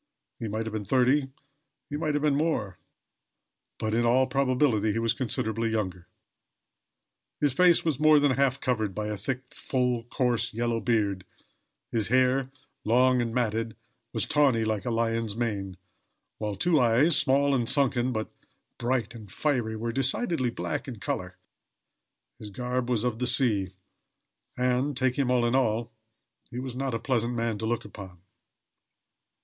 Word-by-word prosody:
He 115 Hz, -, -3 dB
might 110 Hz, +2 st, -3 dB
have 110 Hz, -, -5 dB
been 110 Hz, -1 st, -3 dB
thirty, 130 Hz, +5 st, +2 dB, 0.6 s
he 145 Hz, -, -5 dB
might 150 Hz, 0 st, -1 dB
have 145 Hz, -, 0 dB
been 150 Hz, -2 st, +3 dB
more; 140 Hz, -, -1 dB, 1.0 s
but, 110 Hz, 0 st, -2 dB
in 120 Hz, +1 st, +2 dB
all 125 Hz, +3 st, +4 dB
probability 130 Hz, -4 st, +1 dB
he -, -, -2 dB
was 115 Hz, 0 st, +1 dB
considerably 115 Hz, -2 st, -1 dB
younger. 95 Hz, -5 st, -3 dB, 1.3 s
His 145 Hz, -3 st, +2 dB
face 175 Hz, +3 st, +4 dB
was 155 Hz, -5 st, 0 dB
more 155 Hz, -1 st, +6 dB
than 145 Hz, -1 st, +3 dB
half 135 Hz, 0 st, +1 dB
covered 110 Hz, -8 st, -1 dB
by 105 Hz, 0 st, -3 dB
a 105 Hz, -, -2 dB
full, 125 Hz, +1 st, -2 dB
thick, 120 Hz, -, -26 dB
coarse, 125 Hz, -5 st, 0 dB
yellow 120 Hz, 0 st, 0 dB
beard; 105 Hz, -4 st, 0 dB, 0.7 s
his 110 Hz, -3 st, 0 dB
hair, 130 Hz, +2 st, +2 dB, 0.3 s
long 125 Hz, +3 st, +3 dB
and 115 Hz, -1 st, -2 dB
matted, 115 Hz, -2 st, -1 dB, 0.4 s
was -, -, -1 dB
tawny, 135 Hz, -7 st, +3 dB
like 110 Hz, 0 st, -2 dB
a -, -, -1 dB
lion's 115 Hz, -2 st, -1 dB
mane; 100 Hz, -5 st, -3 dB, 0.6 s
while 105 Hz, -2 st, -2 dB
two 160 Hz, -, +2 dB
eyes, 125 Hz, +7 st, +4 dB
small 140 Hz, +1 st, +3 dB
and 120 Hz, -3 st, +1 dB
sunken 130 Hz, -2 st, +2 dB
but 110 Hz, -2 st, -3 dB, 0.5 s
bright 120 Hz, -1 st, -1 dB
and 110 Hz, -5 st, -11 dB
fiery, 120 Hz, -4 st, -1 dB
were 115 Hz, +2 st, -3 dB
decidedly 135 Hz, -, 0 dB
black 120 Hz, -, -4 dB
in 120 Hz, -5 st, -7 dB
color. 90 Hz, -2 st, -4 dB, 1.0 s
His 105 Hz, -, -7 dB
garb 125 Hz, +3 st, -3 dB
was 120 Hz, -3 st, +1 dB
of 120 Hz, -2 st, -1 dB
the 125 Hz, -, 0 dB
sea, 115 Hz, -7 st, +2 dB, 0.9 s
and, 125 Hz, +2 st, 0 dB
take 130 Hz, +1 st, +1 dB
him 135 Hz, -3 st, +1 dB
all 125 Hz, -1 st, +3 dB
in 120 Hz, -, +1 dB
all, 115 Hz, -3 st, +1 dB, 0.6 s
he 120 Hz, -, -8 dB
was 130 Hz, -1 st, -5 dB
not 130 Hz, -2 st, -2 dB
a -, -, -2 dB
pleasant 120 Hz, -1 st, -1 dB
man 115 Hz, -2 st, -1 dB
to 110 Hz, -, -2 dB
look 120 Hz, -1 st, -1 dB
upon. 95 Hz, -4 st, -11 dB
120 Hz, 160 wpm, -27 LUFS, 110-130 Hz, 1.3 s, more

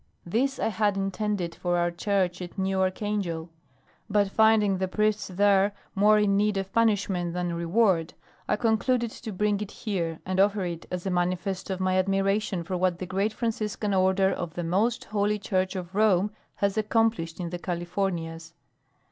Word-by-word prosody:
This 255 Hz, +10 st, 0 dB
I -, -, 0 dB
had 205 Hz, -1 st, +1 dB
intended 195 Hz, -2 st, -2 dB
for 175 Hz, +1 st, -1 dB
our 175 Hz, 0 st, +1 dB
church 185 Hz, 0 st, 0 dB
at 175 Hz, +2 st, -8 dB
New 190 Hz, 0 st, 0 dB
Archangel, 185 Hz, -4 st, -2 dB, 0.6 s
but 200 Hz, -1 st, +2 dB
finding 215 Hz, -3 st, +4 dB
the 190 Hz, -, 0 dB
priests 215 Hz, +2 st, 0 dB
there 200 Hz, +1 st, +3 dB, 0.2 s
more 210 Hz, +2 st, +5 dB
in 205 Hz, -1 st, +3 dB
need 205 Hz, 0 st, +2 dB
of 195 Hz, 0 st, -4 dB
punishment 200 Hz, -6 st, +1 dB
than 175 Hz, -1 st, -1 dB
reward, 170 Hz, 0 st, +1 dB, 0.3 s
I -, -, +2 dB
concluded 235 Hz, +2 st, +1 dB
to 225 Hz, -1 st, -7 dB
bring 205 Hz, +1 st, 0 dB
it 210 Hz, -, -4 dB
here 170 Hz, -8 st, -3 dB
and 185 Hz, 0 st, -1 dB
offer 200 Hz, -1 st, +3 dB
it 170 Hz, -2 st, -5 dB
as 180 Hz, 0 st, -4 dB
a 190 Hz, -, -1 dB
manifest 180 Hz, +2 st, -1 dB
of 190 Hz, -1 st, -2 dB
my 185 Hz, 0 st, +2 dB
admiration 195 Hz, 0 st, 0 dB
for 185 Hz, +2 st, -4 dB
what 180 Hz, -1 st, +1 dB
the 185 Hz, -, -5 dB
great 195 Hz, +4 st, 0 dB
Franciscan 215 Hz, -2 st, -2 dB
Order 190 Hz, +1 st, +3 dB
of 175 Hz, -2 st, -5 dB
the 175 Hz, -, -3 dB
Most 205 Hz, +8 st, +1 dB
Holy 210 Hz, 0 st, 0 dB
Church 190 Hz, -1 st, -1 dB
of 180 Hz, -1 st, -6 dB
Rome 205 Hz, -1 st, +3 dB, 0.2 s
has 200 Hz, +1 st, 0 dB
accomplished 215 Hz, -6 st, 0 dB
in 170 Hz, -2 st, -4 dB
the 175 Hz, -, -4 dB
Californias. 170 Hz, -2 st, -3 dB
195 Hz, 175 wpm, -27 LUFS, 180-210 Hz, 0.6 s, more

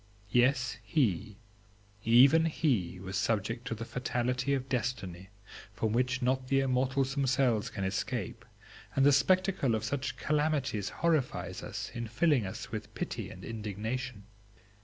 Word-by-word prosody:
Yes, 125 Hz, 0 st, +2 dB
he, 110 Hz, -, 0 dB, 0.7 s
even 135 Hz, +8 st, +6 dB
he, 125 Hz, -, 0 dB
was 95 Hz, +1 st, -6 dB
subject 110 Hz, +5 st, -1 dB
to 115 Hz, -, -2 dB
the 115 Hz, +1 st, -6 dB
fatality 125 Hz, +3 st, -1 dB
of 130 Hz, -1 st, -4 dB
Destiny, 105 Hz, -8 st, -3 dB, 0.4 s
from 110 Hz, 0 st, -1 dB
which 125 Hz, +2 st, +1 dB
not 130 Hz, +1 st, +1 dB
the 135 Hz, 0 st, +3 dB
immortals 135 Hz, +1 st, +1 dB
themselves 130 Hz, -5 st, +1 dB
can 95 Hz, -, -5 dB
escape; 95 Hz, +3 st, -3 dB, 0.5 s
and 135 Hz, -, +4 dB
the 145 Hz, -, +7 dB
spectacle 180 Hz, -, +3 dB
of 110 Hz, -, -2 dB
such 135 Hz, +3 st, -2 dB
calamities 145 Hz, -9 st, 0 dB
horrifies 160 Hz, -6 st, -1 dB
us, -, -, -5 dB
in 120 Hz, -1 st, -4 dB
filling 120 Hz, -, +2 dB
us 95 Hz, -, -7 dB
with -, -, -6 dB
pity -, -, -4 dB
and -, -, -10 dB
indignation. 110 Hz, +1 st, -4 dB
125 Hz, 135 wpm, -31 LUFS, 110-135 Hz, 0.7 s, the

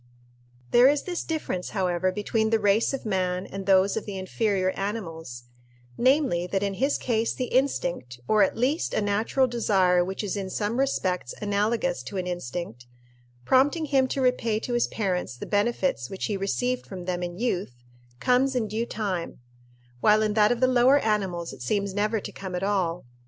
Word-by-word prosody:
There 245 Hz, +2 st, +7 dB
is 290 Hz, 0 st, +1 dB
this 355 Hz, -2 st, -3 dB
difference, 305 Hz, -, -3 dB
however, 185 Hz, 0 st, +1 dB
between 220 Hz, +3 st, 0 dB
the 225 Hz, -, +3 dB
race 205 Hz, +1 st, +2 dB
of 270 Hz, -3 st, -5 dB
man 185 Hz, -2 st, -1 dB
and 195 Hz, 0 st, -7 dB
those 195 Hz, 0 st, +4 dB
of 220 Hz, -, -4 dB
the 200 Hz, -2 st, -5 dB
inferior 190 Hz, 0 st, 0 dB
animals 165 Hz, -, -5 dB, 0.5 s
namely, 255 Hz, -, +2 dB
that 195 Hz, +2 st, -1 dB
in 200 Hz, -1 st, -1 dB
his 280 Hz, +2 st, +2 dB
case 230 Hz, -2 st, 0 dB
the 255 Hz, -2 st, -4 dB
instinct, 175 Hz, -, 0 dB
or 215 Hz, -1 st, +4 dB
at 195 Hz, -, +2 dB
least 265 Hz, +7 st, 0 dB
a -, -, +1 dB
natural 215 Hz, +6 st, +1 dB
desire 190 Hz, -7 st, +2 dB
which 190 Hz, +3 st, -4 dB
is 205 Hz, -, -2 dB
in 195 Hz, -2 st, -4 dB
some 210 Hz, +5 st, -2 dB
respects 185 Hz, -, -1 dB
analogous 215 Hz, +6 st, 0 dB
to 200 Hz, -, -7 dB
an 185 Hz, -, -2 dB
instinct, 170 Hz, -7 st, -5 dB, 0.6 s
prompting 285 Hz, -, +3 dB
him 270 Hz, -3 st, +2 dB
to 270 Hz, -, -2 dB
repay 235 Hz, -4 st, +1 dB
to 245 Hz, -, -4 dB
his 240 Hz, -, +2 dB
parents 180 Hz, -, -2 dB
the -, -, -6 dB
benefits 205 Hz, -, 0 dB
which 190 Hz, -, -4 dB
he 210 Hz, -, -1 dB
received 245 Hz, +6 st, -1 dB
from 185 Hz, -3 st, -7 dB
them 180 Hz, -1 st, -2 dB
in 175 Hz, 0 st, -4 dB
youth, 185 Hz, -, -3 dB, 0.4 s
comes 255 Hz, -, +2 dB
in 235 Hz, -3 st, 0 dB
due 220 Hz, +3 st, -2 dB
time; 195 Hz, -7 st, -3 dB, 0.6 s
while 215 Hz, -, +4 dB
in 215 Hz, -1 st, 0 dB
that 210 Hz, 0 st, +4 dB
of 245 Hz, -, 0 dB
the -, -, +6 dB
lower 255 Hz, +2 st, +5 dB
animals 195 Hz, -8 st, -1 dB
it 135 Hz, -, -12 dB
seems 200 Hz, +9 st, -1 dB
never 210 Hz, +2 st, 0 dB
to -, -, -7 dB
come 190 Hz, -2 st, -6 dB
at 180 Hz, -, -3 dB
all. 185 Hz, -5 st, 0 dB
205 Hz, 185 wpm, -26 LUFS, 185-240 Hz, 0.6 s, There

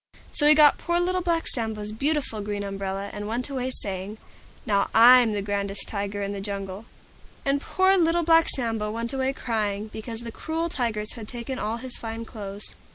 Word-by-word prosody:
So 295 Hz, -, +2 dB
he 305 Hz, -, +8 dB
got 300 Hz, -1 st, +6 dB
poor 345 Hz, 0 st, 0 dB
Little 365 Hz, +1 st, 0 dB
Black 335 Hz, -2 st, 0 dB
Sambo's 220 Hz, -3 st, -2 dB
beautiful 270 Hz, -2 st, -1 dB
Green 205 Hz, 0 st, -3 dB
Umbrella, 195 Hz, 0 st, -4 dB
and 205 Hz, 0 st, -5 dB
went 245 Hz, +5 st, -2 dB
away 260 Hz, -1 st, -2 dB
saying, 200 Hz, -3 st, -2 dB, 0.5 s
"Now 200 Hz, -2 st, +1 dB
I'm 240 Hz, 0 st, +8 dB
the 205 Hz, -1 st, -2 dB
grandest 200 Hz, 0 st, -1 dB
Tiger 205 Hz, -1 st, -3 dB
in 200 Hz, 0 st, -3 dB
the 200 Hz, -, -5 dB
Jungle." 200 Hz, 0 st, -5 dB, 0.6 s
And 275 Hz, 0 st, +1 dB
poor 375 Hz, +4 st, +3 dB
Little 340 Hz, 0 st, +3 dB
Black 330 Hz, 0 st, +5 dB
Sambo 225 Hz, -4 st, -1 dB
went 230 Hz, +3 st, -3 dB
away 265 Hz, 0 st, 0 dB
crying, 215 Hz, -5 st, -2 dB
because 225 Hz, +1 st, -6 dB
the 235 Hz, -1 st, -7 dB
cruel 325 Hz, +6 st, -3 dB
Tigers 220 Hz, -7 st, -2 dB
had 225 Hz, -3 st, -8 dB
taken 245 Hz, +2 st, -5 dB
all 220 Hz, +2 st, -2 dB
his 255 Hz, +1 st, -7 dB
fine 225 Hz, 0 st, -6 dB
clothes. 205 Hz, -2 st, -3 dB
225 Hz, 185 wpm, -25 LUFS, 205-270 Hz, 0.6 s, he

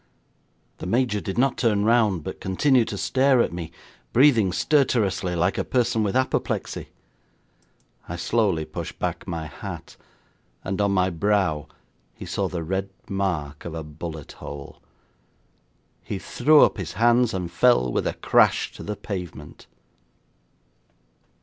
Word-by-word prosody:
The -, -, -5 dB
Major 115 Hz, 0 st, +1 dB
did 95 Hz, -, -5 dB
not 135 Hz, +2 st, +2 dB
turn 105 Hz, -4 st, +2 dB
round, 110 Hz, -7 st, +3 dB
but -, -, -7 dB
continued 120 Hz, +6 st, +2 dB
to 100 Hz, -, -4 dB
stare 130 Hz, +4 st, +3 dB
at 115 Hz, -, +1 dB
me, 85 Hz, -2 st, -6 dB, 0.4 s
breathing 120 Hz, -7 st, +5 dB
stertorously 105 Hz, -, +1 dB
like 90 Hz, +3 st, +1 dB
a -, -, +1 dB
person 120 Hz, -3 st, +1 dB
with 105 Hz, 0 st, -1 dB
apoplexy. 130 Hz, 0 st, -1 dB, 1.2 s
I 85 Hz, -, -3 dB
slowly 90 Hz, -2 st, +1 dB
pushed 75 Hz, -, -7 dB
back -, -, -3 dB
my 80 Hz, -2 st, -4 dB
hat, 80 Hz, -, -8 dB, 0.7 s
and 95 Hz, +1 st, -2 dB
on 100 Hz, -1 st, +2 dB
my 95 Hz, -1 st, +2 dB
brow 90 Hz, -4 st, 0 dB, 0.5 s
he -, -, -9 dB
saw -, -, -1 dB
the 85 Hz, -2 st, -4 dB
red 95 Hz, +3 st, -2 dB, 0.2 s
mark 85 Hz, -7 st, -2 dB
of 85 Hz, -1 st, -6 dB
a 80 Hz, -, -4 dB
bullet 75 Hz, 0 st, -8 dB
hole. 70 Hz, -1 st, -9 dB, 1.2 s
He 100 Hz, -, -4 dB
threw 150 Hz, +9 st, +4 dB
up -, -, +2 dB
his 90 Hz, -3 st, -5 dB
hands 120 Hz, +4 st, +3 dB
and 90 Hz, -2 st, -4 dB
fell 105 Hz, -, +3 dB
with -, -, 0 dB
a -, -, -1 dB
crash -, -, +3 dB
to -, -, -11 dB
the 105 Hz, -, -4 dB
pavement. 90 Hz, -8 st, -7 dB
95 Hz, 145 wpm, -24 LUFS, 85-115 Hz, 1.2 s, breathing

